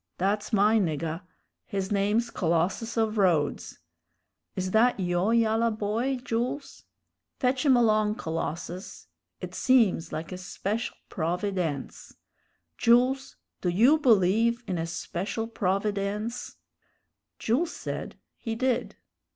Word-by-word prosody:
That's 205 Hz, +4 st, 0 dB
my 215 Hz, +1 st, +4 dB
niggah 165 Hz, -2 st, -2 dB, 0.4 s
his 195 Hz, -1 st, -4 dB
name's 210 Hz, +4 st, +1 dB
Colossus 180 Hz, +7 st, 0 dB
of 220 Hz, -1 st, +1 dB
Rhodes. 165 Hz, -7 st, +1 dB, 0.8 s
Is 185 Hz, 0 st, -2 dB
that 225 Hz, +2 st, +3 dB
yo' 175 Hz, +2 st, +1 dB
yallah 230 Hz, 0 st, +3 dB
boy, 220 Hz, +5 st, -1 dB
Jools? 255 Hz, +3 st, -3 dB, 0.5 s
Fetch 255 Hz, +2 st, +1 dB
him 260 Hz, -2 st, +6 dB
along, 215 Hz, -2 st, +3 dB
Colossus. 165 Hz, -, -5 dB, 0.4 s
It 180 Hz, -1 st, -6 dB
seems 215 Hz, -9 st, +3 dB
like 160 Hz, +3 st, -5 dB
a 185 Hz, -, -6 dB
special 200 Hz, +5 st, -3 dB
provi_dence_. 175 Hz, -4 st, -3 dB, 0.6 s
Jools, 255 Hz, +3 st, +3 dB, 0.3 s
do 180 Hz, -, 0 dB
you 240 Hz, -, +5 dB
believe 230 Hz, -, +3 dB
in 180 Hz, -3 st, -2 dB
a 165 Hz, -, -2 dB
special 190 Hz, +6 st, -4 dB
provi_dence_?" 205 Hz, +2 st, -2 dB, 0.8 s
Jules 290 Hz, +10 st, 0 dB
said -, -, -5 dB, 0.2 s
he 225 Hz, -1 st, -3 dB
did. 255 Hz, +1 st, -1 dB
210 Hz, 110 wpm, -27 LUFS, 180-235 Hz, 0.8 s, him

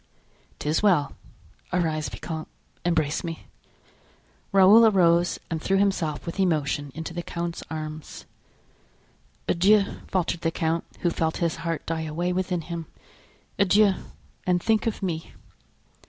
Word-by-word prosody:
"'Tis 150 Hz, +2 st, 0 dB
well; 175 Hz, -9 st, +3 dB, 0.6 s
arise, 155 Hz, -3 st, 0 dB
vicomte, 160 Hz, -2 st, -6 dB, 0.4 s
embrace 160 Hz, -4 st, +1 dB
me." 165 Hz, -2 st, -6 dB, 1.1 s
Raoul 200 Hz, +4 st, +8 dB
arose 175 Hz, -4 st, +3 dB
and 160 Hz, -1 st, -2 dB
threw 195 Hz, +3 st, +2 dB
himself 190 Hz, -7 st, 0 dB
with 170 Hz, +3 st, -5 dB
emotion 145 Hz, -5 st, 0 dB
into 160 Hz, +2 st, -5 dB
the 175 Hz, -, -3 dB
count's 170 Hz, 0 st, -4 dB
arms. 155 Hz, -1 st, -6 dB, 1.2 s
"Adieu," 200 Hz, +3 st, +3 dB
faltered 175 Hz, -2 st, -1 dB
the 165 Hz, -, +1 dB
count, 165 Hz, 0 st, -1 dB, 0.2 s
who 175 Hz, -, +2 dB
felt 160 Hz, -1 st, -1 dB
his 170 Hz, -2 st, 0 dB
heart 165 Hz, -1 st, -3 dB
die 165 Hz, -1 st, -2 dB
away 165 Hz, +3 st, -2 dB
within 180 Hz, -1 st, -1 dB
him; 165 Hz, -1 st, -6 dB, 0.7 s
"adieu, 200 Hz, +1 st, +5 dB, 0.5 s
and 180 Hz, -1 st, +3 dB
think 220 Hz, 0 st, +2 dB
of 215 Hz, -2 st, -3 dB
me." 165 Hz, -3 st, -3 dB
170 Hz, 125 wpm, -25 LUFS, 160-185 Hz, 1.2 s, Raoul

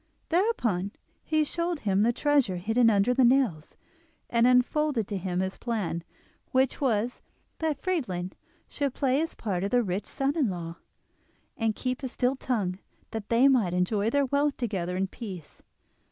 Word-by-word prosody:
Thereupon 245 Hz, -, +1 dB, 0.3 s
he 310 Hz, -1 st, +1 dB
showed 335 Hz, +1 st, -2 dB
him 200 Hz, -1 st, +2 dB
the 230 Hz, +3 st, +4 dB
treasure 280 Hz, -6 st, +2 dB
hidden 225 Hz, +6 st, +3 dB
under 210 Hz, +3 st, +3 dB
the 260 Hz, +1 st, +3 dB
nails, 240 Hz, -, +2 dB, 0.5 s
and 235 Hz, 0 st, +4 dB
unfolded 250 Hz, -1 st, +2 dB
to 205 Hz, -, -2 dB
him 180 Hz, 0 st, -1 dB
his 190 Hz, 0 st, -3 dB
plan, 205 Hz, -8 st, -2 dB, 0.5 s
which 260 Hz, +2 st, +1 dB
was 240 Hz, -2 st, 0 dB, 0.4 s
that 315 Hz, -2 st, -1 dB
Friedlin 190 Hz, -, -2 dB, 0.4 s
should 280 Hz, -3 st, -2 dB
play 270 Hz, +2 st, +2 dB
the 325 Hz, -, -5 dB
part 190 Hz, -5 st, -2 dB
of 200 Hz, -, 0 dB
the 245 Hz, +1 st, +3 dB
rich 190 Hz, 0 st, -3 dB
son 275 Hz, +1 st, -1 dB
in 285 Hz, -9 st, +2 dB
law, 170 Hz, -2 st, -5 dB, 0.8 s
and 225 Hz, -2 st, 0 dB
keep 255 Hz, +1 st, -3 dB
a 265 Hz, -, -2 dB
still 250 Hz, +1 st, 0 dB
tongue, 205 Hz, -9 st, -2 dB, 0.3 s
that 220 Hz, -2 st, -5 dB
they 235 Hz, +4 st, +5 dB
might 225 Hz, -10 st, +3 dB
enjoy 200 Hz, +4 st, +1 dB
their 280 Hz, +3 st, +2 dB
wealth 285 Hz, +2 st, +1 dB
together 185 Hz, -7 st, -2 dB
in 190 Hz, -, +1 dB
peace. 190 Hz, -, -9 dB
235 Hz, 165 wpm, -28 LUFS, 190-270 Hz, 0.8 s, they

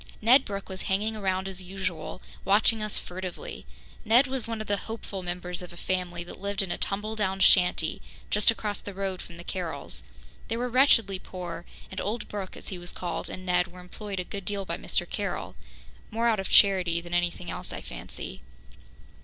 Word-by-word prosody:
Ned 255 Hz, +5 st, +7 dB
Brooke 200 Hz, -1 st, -4 dB
was 190 Hz, 0 st, -6 dB
hanging 210 Hz, +3 st, +1 dB
around 190 Hz, -2 st, 0 dB
as 190 Hz, -1 st, -5 dB
usual, 185 Hz, -3 st, -4 dB, 0.2 s
watching 215 Hz, +2 st, +4 dB
us 215 Hz, -1 st, +1 dB
furtively. 180 Hz, 0 st, -5 dB, 0.4 s
Ned 235 Hz, +5 st, +6 dB
was 260 Hz, -3 st, 0 dB
one 225 Hz, -1 st, -2 dB
of 215 Hz, -, -3 dB
the 205 Hz, -1 st, +1 dB
hopeful 215 Hz, -3 st, -4 dB
members 180 Hz, 0 st, -3 dB
of 180 Hz, -, -8 dB
a 175 Hz, -, -12 dB
family 175 Hz, -1 st, -1 dB
that 175 Hz, -, -10 dB
lived 200 Hz, 0 st, +2 dB
in 185 Hz, -, -3 dB
a -, -, -1 dB
tumble 210 Hz, +2 st, -1 dB
down 195 Hz, -3 st, 0 dB
shanty 180 Hz, -4 st, +5 dB, 0.3 s
just 210 Hz, +2 st, +5 dB
across 210 Hz, -2 st, 0 dB
the 200 Hz, -, -7 dB
road 195 Hz, -2 st, -2 dB
from 170 Hz, -, -10 dB
the 170 Hz, -, -8 dB
Carrolls. 175 Hz, -3 st, -4 dB, 0.5 s
They 225 Hz, -, -1 dB
were 245 Hz, +1 st, 0 dB
wretchedly 230 Hz, -7 st, +5 dB
poor, 175 Hz, -3 st, -6 dB, 0.3 s
and 190 Hz, -, -3 dB
old 215 Hz, +3 st, -2 dB
Brooke, 200 Hz, -3 st, -5 dB
as -, -, -8 dB
he 185 Hz, -, -5 dB
was 175 Hz, 0 st, -5 dB
called, 175 Hz, -2 st, -3 dB
and 185 Hz, -, -6 dB
Ned 180 Hz, 0 st, +3 dB
were 180 Hz, 0 st, -12 dB
employed 195 Hz, +2 st, -5 dB
a -, -, 0 dB
good 200 Hz, +2 st, -5 dB
deal 200 Hz, 0 st, -2 dB
by -, -, -2 dB
Mr. -, -, 0 dB
Carroll -, -, -3 dB, 0.5 s
more 230 Hz, +2 st, +1 dB
out 220 Hz, -3 st, +4 dB
of 195 Hz, -, -2 dB
charity 185 Hz, -4 st, +6 dB
than 175 Hz, 0 st, -8 dB
anything 175 Hz, 0 st, 0 dB
else, -, -, -4 dB
I -, -, -5 dB
fancy. -, -, -6 dB
190 Hz, 200 wpm, -28 LUFS, 180-210 Hz, 0.5 s, Ned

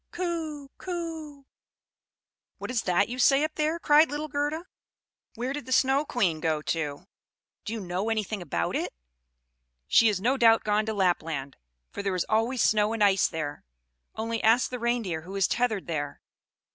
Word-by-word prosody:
Coo! 325 Hz, -5 st, -4 dB
Coo!" 325 Hz, -5 st, -6 dB, 1.1 s
"What -, -, -5 dB
is 240 Hz, -3 st, 0 dB
that 180 Hz, +2 st, +2 dB
you 250 Hz, +2 st, -6 dB
say 275 Hz, +3 st, +5 dB
up 310 Hz, 0 st, -1 dB
there?" 310 Hz, +2 st, 0 dB
cried 305 Hz, -1 st, +5 dB
little 295 Hz, +1 st, -3 dB
Gerda. 295 Hz, +4 st, -2 dB, 0.7 s
"Where 245 Hz, +3 st, -3 dB
did 285 Hz, -3 st, -6 dB
the -, -, -7 dB
Snow 270 Hz, +3 st, +3 dB
Queen 185 Hz, -, 0 dB
go 155 Hz, -1 st, -1 dB
to? 155 Hz, 0 st, -3 dB, 0.6 s
Do 215 Hz, -, -3 dB
you 230 Hz, -, -3 dB
know 185 Hz, +2 st, -2 dB
anything 215 Hz, -2 st, -2 dB
about 85 Hz, -, -2 dB
it?" -, -, -3 dB, 0.9 s
"She 230 Hz, -, +5 dB
is 205 Hz, -3 st, -1 dB
no 250 Hz, +7 st, +1 dB
doubt 225 Hz, -2 st, +5 dB
gone 210 Hz, 0 st, +1 dB
to 220 Hz, -, -1 dB
Lapland; 165 Hz, -8 st, -1 dB, 0.4 s
for -, -, -5 dB
there 195 Hz, -2 st, -1 dB
is 180 Hz, -, 0 dB
always 230 Hz, +3 st, +1 dB
snow 215 Hz, 0 st, +3 dB
and 225 Hz, -2 st, +1 dB
ice 195 Hz, -2 st, +4 dB
there. 150 Hz, -2 st, -5 dB, 0.5 s
Only 225 Hz, +1 st, -2 dB
ask 230 Hz, +4 st, +4 dB
the 250 Hz, -, -4 dB
Reindeer, 230 Hz, -9 st, -1 dB
who 185 Hz, +4 st, -9 dB
is 195 Hz, -2 st, +3 dB
tethered 230 Hz, -5 st, 0 dB
there." 145 Hz, -4 st, -4 dB
225 Hz, 170 wpm, -27 LUFS, 185-275 Hz, 1.1 s, say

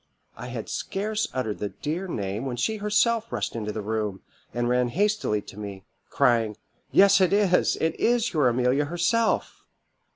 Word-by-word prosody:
I -, -, -8 dB
had -, -, -6 dB
scarce 215 Hz, +2 st, -2 dB
uttered 120 Hz, -5 st, -3 dB
the 105 Hz, -, -2 dB
dear 165 Hz, -, -4 dB
name 100 Hz, -, -3 dB
when 125 Hz, -2 st, -4 dB
she 220 Hz, -, 0 dB
herself 215 Hz, +2 st, +1 dB
rushed -, -, -3 dB
into 105 Hz, -2 st, -3 dB
the 105 Hz, 0 st, -5 dB
room, 105 Hz, -2 st, -2 dB, 0.3 s
and 120 Hz, 0 st, -1 dB
ran 125 Hz, 0 st, +2 dB
hastily 195 Hz, -, 0 dB
to 105 Hz, -, -11 dB
me, 100 Hz, -2 st, -7 dB, 0.2 s
crying, 115 Hz, -3 st, +2 dB, 0.3 s
'Yes, 200 Hz, 0 st, +6 dB
it 185 Hz, -, +4 dB
is, 200 Hz, -3 st, +3 dB
it 160 Hz, -, -1 dB
is 235 Hz, -2 st, +2 dB
your 150 Hz, -5 st, +3 dB
Amelia 125 Hz, +4 st, +1 dB
herself. 175 Hz, +8 st, 0 dB
145 Hz, 165 wpm, -25 LUFS, -, 0.3 s, Yes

